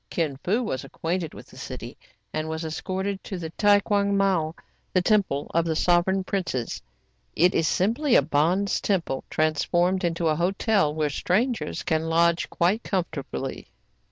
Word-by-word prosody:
Kin 155 -5 -1
Fo 215 +7 +1
was 130 - -3
acquainted 165 -1 -3
with - - -10
the - - -17
city, - - -7 0.4
and 155 0 -2
was 160 +1 -3
escorted 190 +5 -3
to 190 - -5
the 165 -2 -6
Tae 205 +2 +4
Ouang 200 -1 +2
Miao, 180 -5 +1 0.2
— - - -42
the 185 - +5
Temple 185 -9 +1
of 170 - +3
the 160 -1 0
Sovereign 180 +3 +2
Princes. 175 - -3 0.5
It 180 +3 +4
is 160 - +2
simply 235 - +2
a - - +6
bonze 170 +7 +1
temple 170 -9 -1
transformed 175 +4 +1
into 170 -1 0
a 155 - +2
hotel, 190 0 +1
where 150 -1 -1
strangers 225 - -1
can 160 0 0
lodge 170 +1 +2
quite 185 +7 +1
comfortably. 160 - -4
175 Hz, 160 wpm, -25 LUFS, 160-195 Hz, 0.5 s, a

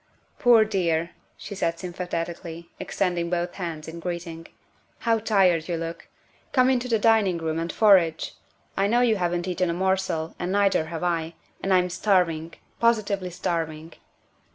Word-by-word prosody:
" - - -38
Poor 235 -3 +6
dear," 170 -5 0 0.3
she - - -8
said 170 -4 -1
sympathetically, 170 -1 -5
extending 175 -3 -1
both 175 0 -1
hands 165 -5 -5
in 165 +1 -7
greeting, 170 -1 -5 0.3
" - - -38
how 225 -1 +3
tired 190 -7 +2
you 170 - -1
look. 165 0 -6 0.5
Come 255 -1 +4
into 250 -1 0
the 230 -2 +2
dining 215 -5 +3
room 160 -1 -2
and 165 +1 -2
forage; 185 -7 +4 0.4
I 195 - +2
know 240 +4 +3
you 230 -3 +3
haven't 175 -1 -1
eaten 180 -1 0
a 170 - -1
morsel, 185 -3 0
and 175 +1 -2
neither 200 -4 +2
have 165 +1 -6
I, 165 -2 -1 0.3
and 195 - -1
I'm 180 -1 +3
starving 175 -4 +1 0.2
positively 205 -5 +1
starving." 165 -2 -3
175 Hz, 160 wpm, -25 LUFS, 165-200 Hz, 0.5 s, Poor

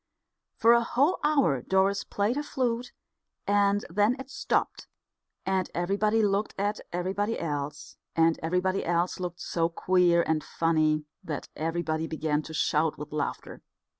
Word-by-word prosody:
For 230 +1 +6
a 235 0 +4
whole 280 +8 +2
hour 280 - +3
Doris 190 +5 +2
played 205 +4 -1
her 290 - -1
flute, 250 -4 -2 0.5
and 205 0 +2
then 205 +7 +2
it 265 0 -9
stopped, - - -1 0.6
and 190 -1 0
everybody 205 +5 +1
looked 205 +1 0
at 205 +2 -1
everybody 195 +5 -1
else; 145 -2 -4 0.2
and 165 0 +3
everybody 180 +3 0
else 175 +2 0
looked 175 -1 -5
so 165 -1 0
queer 175 -1 +3
and 155 -1 0
funny 155 -2 +1 0.2
that 150 -3 -5
everybody 160 0 -2
began 155 -1 -1
to 160 - -10
shout 155 0 +1
with 150 - -8
laughter. 150 -1 -4
180 Hz, 140 wpm, -28 LUFS, 160-205 Hz, 0.6 s, For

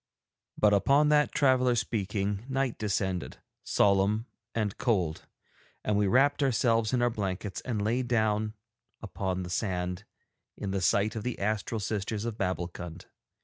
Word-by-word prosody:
But 105 -1 +4
upon 140 +9 +4
that 150 0 +4
traveller 130 -3 +3
speaking 105 -2 -1
night 135 -2 -1
descended, 95 -3 -2 0.3
solemn 100 +3 +2 0.3
and 105 -3 -1
cold, 90 -10 0 0.6
and 105 - +1
we 105 0 +2
wrapped 140 +7 +3
ourselves 115 -4 +2
in 125 -2 +2
our 120 - +3
blankets 100 -2 -3
and 110 -5 -2
lay 115 +4 +1
down 110 -3 0 0.5
upon 95 -1 -3
the 90 - -7
sand 90 -1 -2 0.5
in 100 - -4
the 95 -1 -1
sight 100 +5 +2
of 110 - -3
the 125 +2 -3
astral 105 +2 -1
sisters 105 +1 -2
of 115 -2 -3
Babbulkund. 90 -3 -4
105 Hz, 145 wpm, -29 LUFS, 95-120 Hz, 0.6 s, But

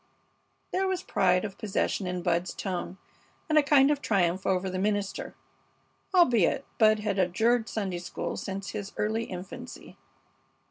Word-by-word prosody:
There 380 +1 +1
was 375 -1 -1
pride 180 +1 +2
of 195 -2 -7
possession 205 -2 -1
in 180 -1 -3
Bud's 175 +1 0
tone, 190 -1 -4 0.5
and 310 - +1
a 305 - +7
kind 285 -1 +5
of 290 -1 0
triumph 185 -5 +1
over 190 0 +1
the 185 0 -3
minister, 205 0 -2 0.8
albeit 275 - +4
Bud 215 -1 +5
had 205 -2 -1
adjured 225 +6 +2
Sunday 190 -5 -3
school 175 - -4
since 195 0 -5
his 200 -1 -6
early 220 +2 0
infancy. 185 +1 -9
200 Hz, 145 wpm, -28 LUFS, 185-230 Hz, 0.8 s, a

